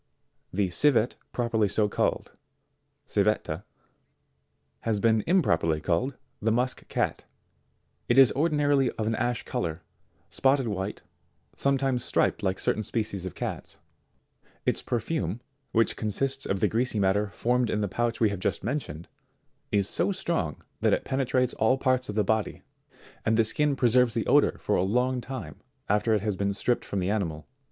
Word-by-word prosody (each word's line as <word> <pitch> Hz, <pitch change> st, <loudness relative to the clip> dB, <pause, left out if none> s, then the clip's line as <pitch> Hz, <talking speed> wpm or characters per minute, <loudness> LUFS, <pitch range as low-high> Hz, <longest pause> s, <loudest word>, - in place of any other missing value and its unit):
63. 100 Hz, +2 st, 0 dB
The -, -, -3 dB
Civet 125 Hz, +1 st, +3 dB, 0.2 s
properly 115 Hz, -3 st, +1 dB
so 105 Hz, +2 st, +1 dB
called, -, -, -1 dB, 0.7 s
Civetta, 100 Hz, -4 st, 0 dB, 1.1 s
has 110 Hz, -3 st, -1 dB
been 110 Hz, +1 st, +3 dB
im 180 Hz, +1 st, +4 dB
properly 80 Hz, -, +1 dB
called 100 Hz, -, -1 dB, 0.2 s
the 110 Hz, -, +1 dB
musk 125 Hz, +3 st, -1 dB
cat. -, -, -1 dB, 0.8 s
It 120 Hz, -, +3 dB
is 135 Hz, -3 st, +8 dB
ordinarily 145 Hz, -3 st, +2 dB
of 110 Hz, -, -3 dB
an 110 Hz, -, 0 dB
ash 120 Hz, +1 st, -1 dB
colour, 80 Hz, -1 st, -3 dB, 0.4 s
spotted 135 Hz, -1 st, +2 dB
white, 100 Hz, -1 st, -4 dB, 0.5 s
sometimes 135 Hz, -3 st, +1 dB
striped -, -, +1 dB
like 95 Hz, -2 st, 0 dB
certain -, -, 0 dB
species 105 Hz, -4 st, -2 dB
of -, -, -8 dB
cats. -, -, -5 dB, 0.9 s
Its -, -, +1 dB
perfume, 115 Hz, -, -2 dB, 0.3 s
which 115 Hz, 0 st, +2 dB
consists 135 Hz, +6 st, -1 dB
of 95 Hz, -1 st, -1 dB
the -, -, +4 dB
greasy 115 Hz, -1 st, 0 dB
matter 100 Hz, +2 st, +2 dB
formed 125 Hz, +3 st, 0 dB
in 105 Hz, -, 0 dB
the 105 Hz, -, 0 dB
pouch 115 Hz, +4 st, -1 dB
we 110 Hz, -, +4 dB
have 100 Hz, -2 st, -4 dB
just -, -, -2 dB
mentioned, 100 Hz, -, -4 dB, 0.6 s
is 100 Hz, -2 st, +2 dB
so -, -, 0 dB
strong 170 Hz, -, -2 dB, 0.2 s
that -, -, +3 dB
it -, -, 0 dB
penetrates 130 Hz, -1 st, 0 dB
all 110 Hz, +4 st, +2 dB
parts 130 Hz, -2 st, +1 dB
of 105 Hz, -, -4 dB
the 105 Hz, -, +3 dB
body, 110 Hz, +1 st, -1 dB, 0.6 s
and 110 Hz, 0 st, +2 dB
the 115 Hz, -, +4 dB
skin 145 Hz, +5 st, +1 dB
preserves 125 Hz, -2 st, +3 dB
the -, -, 0 dB
odour -, -, +4 dB
for -, -, -1 dB
a -, -, +2 dB
long 125 Hz, +6 st, +1 dB
time 115 Hz, -, -7 dB, 0.3 s
after 105 Hz, +2 st, +2 dB
it 105 Hz, -, 0 dB
has 105 Hz, -1 st, -1 dB
been 100 Hz, +1 st, -1 dB
stripped 120 Hz, +4 st, 0 dB
from 100 Hz, -, -3 dB
the 90 Hz, +2 st, 0 dB
animal. 80 Hz, -8 st, -2 dB
110 Hz, 165 wpm, -27 LUFS, 100-130 Hz, 1.1 s, is